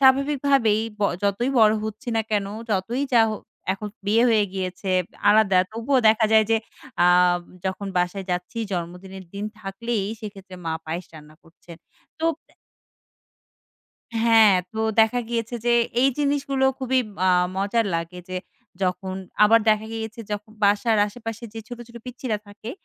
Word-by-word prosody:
স্বাভাবিকভাবেই 270 -4 +3 0.2
ব - - 0 0.2
যতই 205 +6 +1
বড়ো 215 0 +6
হচ্ছি 220 +5 -6
না 225 - +2
কেন 205 -2 +1 0.2
যতই 210 +7 0
যা 235 - +7 0.5
এখন 210 +2 -6 0.2
বিয়ে 225 +3 +4
হয়ে 215 -2 +4
গিয়েছে 185 0 -3 0.4
আলাদা 205 -3 +4
তবুও 230 +5 +1
দেখা 220 0 +4
যায় 220 -1 +6
যে 225 - +5 0.5
আ - - +6 0.6
যখন 190 +1 -3
বাসায় 180 +2 -1
যাচ্ছি 180 +6 -3
জন্মদিনের 180 +2 -6
দিন 200 +1 -4 0.2
থাকলেই 210 +1 -3 0.2
সেক্ষেত্রে 195 -4 -9
মা 160 - 0
পায়েস 170 +2 -4
রান্না 155 0 -13
করছেন 170 0 -15 0.4
তো - - -1 0.3
এ - - -30 1.7
হ্যাঁ, 225 -2 +6 0.2
তো 220 - -6 0.2
দেখা 220 +3 +3
গিয়েছে 235 0 -2
যে 240 - +4 0.3
এই 270 - +5
জিনিসগুলো 280 -2 0
খুবই 260 0 +1 0.3
আ - - +5 0.3
মজার 205 +4 +1
লাগে 165 +2 -3
যে 185 - -4 0.5
যখন 185 +1 -1 0.3
আবার 225 +2 +6
দেখা 215 0 +3
গিয়েছে 225 0 -5
যখন 210 +1 -5
বাসার 210 +2 +3
আশেপাশে 225 +1 -7
যে - - -5
ছোটো, 240 -1 -7
ছোটো 235 -1 -11
পিচ্ছিরা 250 -3 -3
থাকে 205 +3 -9
215 Hz, 145 wpm, -23 LUFS, 195-235 Hz, 1.7 s, যা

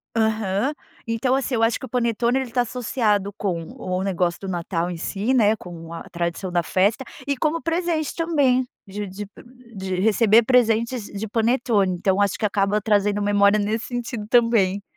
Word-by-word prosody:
Aham. 220 +2 +1 0.3
Então 230 +3 0
assim 270 -1 0
eu 225 - +1
acho 225 0 +2
que - - -7
o - - -22
panetone 235 +1 +1
ele 265 - -3
está 245 +2 +1
associado 220 -4 0
com 180 -6 -2 0.2
o 185 -3 -2
negócio 180 -3 0
do 195 - -6
Natal 175 -1 -2
em 175 - -5
si 205 +8 -1
né, 220 -4 +4
com 170 -4 -10
a 165 - -7
tradição 170 +2 -3
da 175 -1 +2
festa, 200 +9 +1 0.2
e 280 - +1
como 315 +5 0
presente 330 -2 -1
também, 280 -7 +2 0.2
de 205 +1 -5
de 195 +2 -7 0.5
de 190 -1 -3
receber 220 +2 +5
presentes 230 -1 +2
de 205 +2 -6
panetone. 225 -3 +1
Então 190 +2 +1
acho 200 -1 +1
que - - -1
acaba 200 0 +1
trazendo 205 -1 +1
memória 205 0 +4
nesse 215 +2 -1
sentido 240 -3 -4
também. 220 -5 +3
215 Hz, 175 wpm, -23 LUFS, 195-240 Hz, 0.5 s, receber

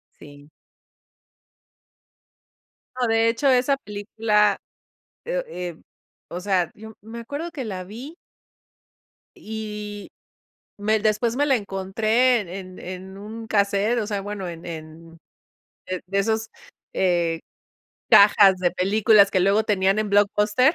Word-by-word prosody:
Sí 145 0 -15 2.5
No, 245 - +2
de 225 0 +3
hecho, 230 +5 0
esa 260 +2 +3
película, 210 -1 0 0.7
eh - - -2
eh, 175 - -7 0.5
o 175 - -5
sea, 185 -3 0
yo, 220 +1 -12
me 225 +3 -9
acuerdo 285 +8 -6
que 280 -5 -5
la 190 -4 -5
vi 240 - -9 1.2
y 210 - -7 0.7
me 215 +1 +1
después 215 +2 +1
me 290 - +2
la 275 -2 +3
encontré 215 +4 +1
en 190 - -10
en 185 0 -8
en 185 +1 -8
un 220 +3 -8
cassette, 205 +2 +1
o 210 - -3
sea, 205 -2 -2
bueno, 200 -1 -5
en 170 -1 -8
en 165 0 -9 0.9
de 195 +2 -2
esos 220 +2 -1 0.4
eh, 170 -3 +1 0.7
cajas 200 -1 +7
de 180 -1 +1
películas 200 +2 +4
que 185 - +2
luego 200 +4 +3
tenían 195 -1 +2
en 215 -1 -1
Blockbuster. 210 - +3
210 Hz, 125 wpm, -23 LUFS, 190-225 Hz, 2.5 s, cajas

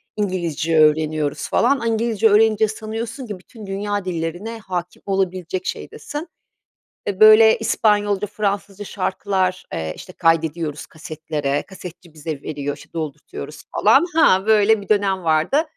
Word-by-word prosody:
İngilizce 170 -5 -1
öğreniyoruz 155 -1 +1
falan. 280 -2 +2
A 230 - -2
İngilizce 225 -1 +2
öğrenince 215 +1 +4
sanıyorsun 225 +3 -6
ki 205 -3 -6
bütün 215 +3 -13
dünya 200 0 -3
dillerine 180 +6 -4
hâkim 180 -3 -5
olabilecek 185 -2 -2
şeydesin. 300 +4 -6 0.8
Eee, 200 -1 -3
böyle 215 +1 +8
İspanyolca, 210 -2 +1
Fransızca 200 -1 -3
şarkılar, 190 -1 -1
eee, 80 -1 -3
işte 185 - -11
kaydediyoruz 165 -2 0
kasetlere. 155 -2 -4
Kasetçi 180 -3 -11
bize 155 -2 -6
veriyor, 145 -2 -4
işte - - -17
doldurtuyoruz 150 -2 -7
falan. 270 +10 +5
Ha 190 -11 +4
böyle 220 -1 +4
bir 200 - -13
dönem 195 -3 +1
vardı 160 - +2
190 Hz, 130 wpm, -21 LUFS, 160-215 Hz, 0.8 s, böyle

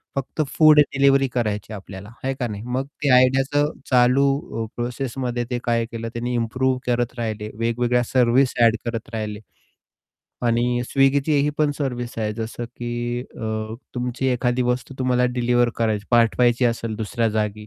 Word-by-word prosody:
फक्त 135 +3 -2 0.2
food 155 -1 +7
delivery 135 -1 +4
करायची 110 -3 -2
आपल्याला 95 0 -9
आहे 135 0 0
का 120 - -1
नाही 105 -1 -6
मग 130 +2 -2 0.2
ते 140 - +2
आयडियाचं 135 +4 +3 0.2
चालू 130 -1 +2
प्रोसेसमध्ये 125 0 -3
ते 125 - -1
काय 115 -1 +1
केलं 115 0 -5
त्यांनी 120 +1 -3
इम्प्रूव्ह 130 +3 0
करत 120 0 0
राहि, 115 -2 -1
ले 105 0 -5
वेगवेगळ्या 120 +1 +1
सर्व्हिस 125 +1 +3
एड 115 0 +5
करत 115 +2 -4
राहिले. 105 -1 -4 1.1
आणि 120 +1 +1
Swiggy 135 +1 +4
ही 145 0 +3
पण 150 -1 +3
सर्व्हिस 125 -4 -3
आहे 105 -1 -1
जसं 115 +1 -5
की 120 0 -4
अ, 110 -2 -5 0.2
तुमची 125 +1 -2
एखादी 125 0 0
वस्तू 125 +2 -2
तुम्हाला 125 -1 +2
डिलिव्हर 120 0 +2
करायची 110 -2 -1
पाठवायची 120 +1 +3
असेल 115 -2 -1
दुसऱ्या 115 +1 -1
जागी. 105 0 -2
120 Hz, 155 wpm, -22 LUFS, 115-130 Hz, 1.1 s, food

